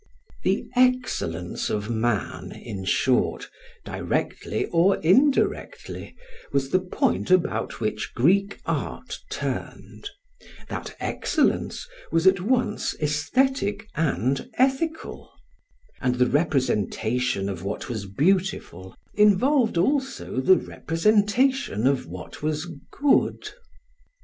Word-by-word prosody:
The - - 0
excellence 250 - 0
of 105 -1 -2
man, 115 -2 -1
in 95 -2 -7
short, 130 +6 +1 0.3
directly - - -2
or 175 +3 +3
indirectly, 265 - +1 0.4
was 135 -1 0
the 185 - +4
point 185 0 -1
about 185 -1 +1
which - - -3
Greek 195 +10 +2
art - - -3
turned; - - -5 0.6
that - - -6
excellence - - 0 0.2
was 165 +1 +2
at 190 -1 +5
once 225 0 0
aesthetic 205 - 0
and 135 - 0
ethical; 270 +5 -1 0.7
and 125 -2 +1
the 125 0 +3
representation 125 - 0
of 95 -4 -4
what 100 +2 -4
was 110 -4 -4
beautiful 145 - -1 0.2
involved 220 - +3
also 265 - 0
the 185 +8 +6
representation 210 - +1
of 135 -9 +1
what 90 +2 -9
was 155 +2 -2 0.2
good. 285 -1 +1
165 Hz, 100 wpm, -25 LUFS, -, 0.7 s, the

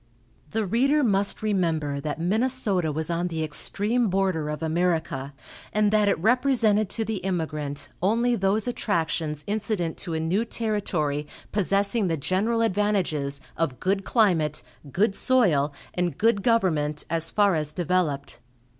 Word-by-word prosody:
The 220 +3 -1
reader 275 +9 +2
must 200 -2 +1
remember 165 -8 0
that 150 +2 -4
Minnesota 205 -2 +1
was 160 +2 -3
on 170 +1 0
the 160 -2 -3
extreme 210 +9 0
border 185 -5 0
of 150 +1 -4
America, 160 -4 -1 0.4
and 210 -1 +2
that 210 -1 +3
it - - +2
represented 225 -1 +2
to 225 - -1
the 220 0 -2
immigrant 155 -6 -3
only 230 +6 +2
those 200 +2 +1
attractions 160 -9 -1
incident 205 -5 -2
to 170 -4 -4
a - - -1
new 175 +7 +1
territory 185 -11 -2 0.2
possessing 200 +1 +1
the 165 -2 0
general 210 +10 0
advantages 185 -10 0
of 150 -6 -2
good 195 +1 0
climate, 165 - +2 0.3
good 200 - +1
soil 180 - +3 0.2
and 175 -1 -1
good 225 -2 +2
government 160 -10 +1
as 165 0 +1
far 205 -2 +3
as 150 -2 -1
developed. 165 -4 -1
185 Hz, 140 wpm, -25 LUFS, 160-215 Hz, 0.4 s, that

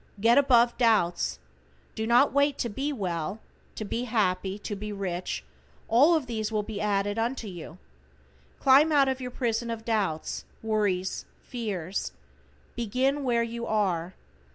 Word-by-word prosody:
Get 230 +5 +5
above 245 -4 +4
doubts. 215 - +2 0.6
Do 220 0 -3
not 245 +4 +4
wait 280 0 +2
to 240 - -2
be 270 +8 -2
well, 185 - -3 0.4
to 215 - -4
be 235 +4 -2
happy, 195 -4 0
to 205 0 -5
be 210 +1 -6
rich, 185 -3 -3 0.4
all 285 +9 +5
of 310 -5 0
these 225 -2 -3
will 215 -1 0
be 205 -1 -5
added 205 +1 0
unto 235 0 -2
you. 175 -3 -9 0.8
Climb 280 +4 +6
out 280 -2 +5
of 265 0 -1
your 250 - -4
prison 235 -2 -2
of 225 -1 -5
doubts, 200 -9 -1 0.2
worries, 205 -4 0 0.2
fears. 200 -7 -4 0.6
Begin 255 +5 0
where 235 -2 +2
you 235 0 -5
are. 185 -5 0
225 Hz, 150 wpm, -27 LUFS, 200-245 Hz, 0.8 s, Climb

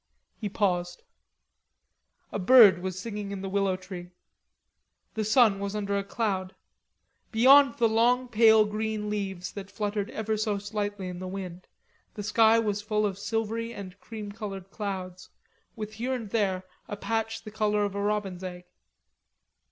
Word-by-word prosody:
He 210 - -4
paused. 180 -3 -1 1.3
A - - -3
bird 205 -3 +7
was 185 0 -4
singing 210 0 -5
in 195 -1 -5
the - - -3
willow 195 -1 +1
tree. 185 -1 -9 1.0
The 220 - -1
sun 215 -2 +4
was 200 +1 -3
under 200 -1 -1
a 200 - 0
cloud; 195 -3 -2 0.8
beyond 265 +3 +6
the 230 - +4
long 240 +3 +3
pale 220 -2 +6
green 215 0 -3
leaves 190 -3 -3
that 200 -1 -8
fluttered 205 0 -2
ever 220 -2 -2
so 210 -1 0
slightly 205 -1 -4
in 180 -1 -6
the 185 - -5
wind, 185 -2 -7 0.5
the 210 - -5
sky 220 +2 +5
was 210 -3 0
full 210 0 0
of 195 -2 -3
silvery 225 +2 -2
and 195 -1 -9
cream 215 -2 -7
colored 195 -3 -7
clouds, 185 -3 -5 0.5
with 215 -2 -6
here 245 +4 -2
and 225 -5 -6
there 190 -4 0 0.2
a 205 - -5
patch 225 +1 -2
the 215 - -9
color 210 -1 +1
of 200 - -3
a 200 - -3
robin's 200 -3 -2
egg. 180 -1 -6
205 Hz, 160 wpm, -28 LUFS, 195-220 Hz, 1.3 s, bird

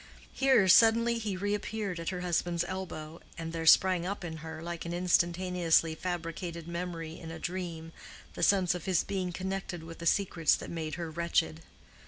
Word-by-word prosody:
Here 265 -7 +4
suddenly 230 +4 +5
he 210 -4 -3
reappeared 205 -1 -2
at 165 - -3
her 180 -1 -4
husband's 175 -1 0
elbow, 170 -4 -6 0.2
and 165 0 -5
there 165 -1 -3
sprang 185 +1 +6
up 195 +2 -4
in 160 -2 -5
her, 160 0 -7
like 170 -1 -5
an 170 +1 -4
instantaneously 175 -2 +2
fabricated 170 -1 -5
memory 170 -2 -5
in 165 - -8
a 165 - -6
dream, 170 -2 -5 0.4
the - - -7
sense 190 -3 +4
of 180 -2 -6
his 185 -3 +2
being 185 -2 -2
connected 190 -1 -4
with 165 0 -10
the 170 - -2
secrets 175 -4 +3
that - - -7
made 160 -2 -4
her 170 -2 -5
wretched. 165 -1 0
175 Hz, 175 wpm, -30 LUFS, 165-185 Hz, 0.4 s, sprang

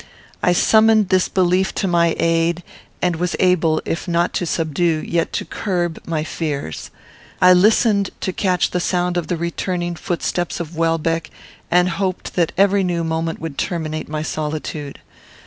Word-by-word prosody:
I 180 - +3
summoned 220 +2 +4
this 185 -1 +2
belief 185 0 +1
to 195 - 0
my 170 -2 +2
aid, 165 +1 +1 0.4
and 175 -2 +1
was 175 +1 -1
able, 170 -4 +2
if 165 - -3
not 170 0 +1
to 175 - -1
subdue, 160 0 0
yet 170 -1 0
to - - -2
curb, 175 -5 -2
my 160 -2 -1
fears. 145 - -4 0.5
I 180 0 +7
listened 200 +1 +3
to 185 - -2
catch 185 -2 +1
the 180 - 0
sound 180 0 0
of 175 -2 -1
the 175 - -1
returning 175 +1 -2
footsteps 175 +1 -2
of 170 -1 -6
Welbeck, 165 0 0 0.4
and 180 +1 +4
hoped 185 +1 -3
that 170 -3 +1
every 200 0 +4
new 175 -2 -1
moment 160 0 -2
would 160 -4 -5
terminate 155 -3 -3
my 155 0 -3
solitude. 150 -2 -4
175 Hz, 160 wpm, -20 LUFS, 165-180 Hz, 0.5 s, I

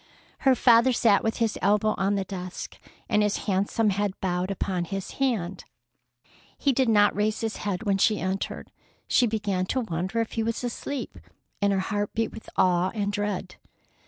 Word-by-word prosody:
Her 265 -2 +4
father 240 +1 +5
sat 225 -4 +3
with 225 - -1
his 225 -2 0
elbow 210 +2 +3
on 195 +1 +1
the 195 - 0
desk, 185 -1 -7 0.3
and 210 -2 +2
his 210 -1 0
handsome 205 +2 +1
head 200 0 -2
bowed 180 0 -1
upon 185 -2 -2
his 195 +2 -5
hand. 200 -9 0 0.9
He 280 - +2
did 255 -1 +2
not 205 -2 +4
raise 210 +1 0
his 225 -1 -2
head 200 0 -3
when 200 -2 +1
she 215 +2 +3
entered. 190 +1 -3 0.4
She 245 - +4
began 205 -4 -1
to 260 - 0
wonder 185 +1 -2
if 230 - -1
he 225 - -1
was 230 +2 -2
asleep, 250 +3 -4 0.4
and 200 0 +3
her 195 - +1
heart 205 +1 -2
beat 225 0 0
with 220 - -11
awe 180 0 +3
and 205 -1 -1
dread. 205 -2 -3
205 Hz, 180 wpm, -26 LUFS, 190-225 Hz, 0.9 s, father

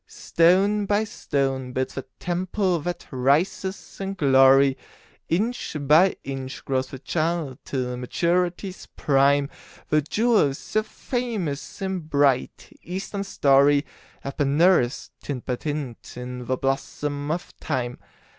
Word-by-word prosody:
Stone 195 +5 +2
by 205 +2 +2
stone 135 -9 -2
builds 130 +1 -2
the 135 - -5
temple 180 +1 -1
that 175 +4 -4
rises 150 +9 0
in 195 0 -3
glory, 135 -2 +5 0.5
Inch 210 0 -1
by 155 +7 +5
inch 135 -1 -6
grows 130 -1 0
the 135 - -8
child 155 -1 -2
till 125 -2 -3
maturity's 175 - -1
prime; 140 0 +3 0.4
The 155 0 +3
jewels 205 - +2
so 215 - -1
famous 215 - -4
in 190 -1 -1
bright, 145 -5 0
Eastern 195 +2 -4
story 140 -4 +4 0.4
Have 140 0 -6
been 140 -1 +1
nursed, 170 -8 +3
tint 135 -4 -5
by 125 - -1
tint, 145 -7 -5
in 125 0 -6
the 130 - 0
blossom 145 +2 -2
of 170 +3 -3
Time. 125 -4 -3
145 Hz, 125 wpm, -24 LUFS, 135-180 Hz, 0.5 s, glory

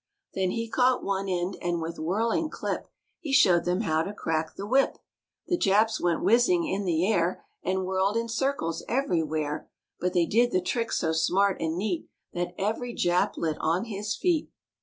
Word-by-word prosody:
Then 190 -1 0
he 230 +4 -2
caught 250 +2 +2
one 195 0 -1
end 180 +1 -1
and 175 -1 -1
with 165 +1 -5
whirling 225 - 0
clip - - -4 0.3
He 320 -6 -5
showed 175 -10 +5
them 180 +3 +1
how 160 -7 +1
to 200 +5 -4
crack 160 -4 -2
the 200 - -5
whip. 265 +5 +2 0.5
The 350 -2 0
Japs 215 +3 +3
went 170 -2 +1
whizzing 325 - +4
in 200 -6 -2
the 170 -1 +1
air 185 - 0 0.2
And 190 0 -1
whirled 190 +3 +1
in 230 0 -1
circles 230 -9 -1
everywhere; 160 - -1 0.3
But 180 +1 -1
they 175 -2 +3
did 235 +7 +3
the 185 - +2
trick 230 +5 -2
so 160 - 0
smart 185 +5 +2
and 165 0 -1
neat 185 -3 -2 0.3
That 175 0 -3
every 225 +4 -2
Jap 175 +1 +1
lit 160 -2 -1
on 165 +5 +1
his 210 -1 -3
feet. 345 -4 0
190 Hz, 180 wpm, -27 LUFS, 170-230 Hz, 0.5 s, showed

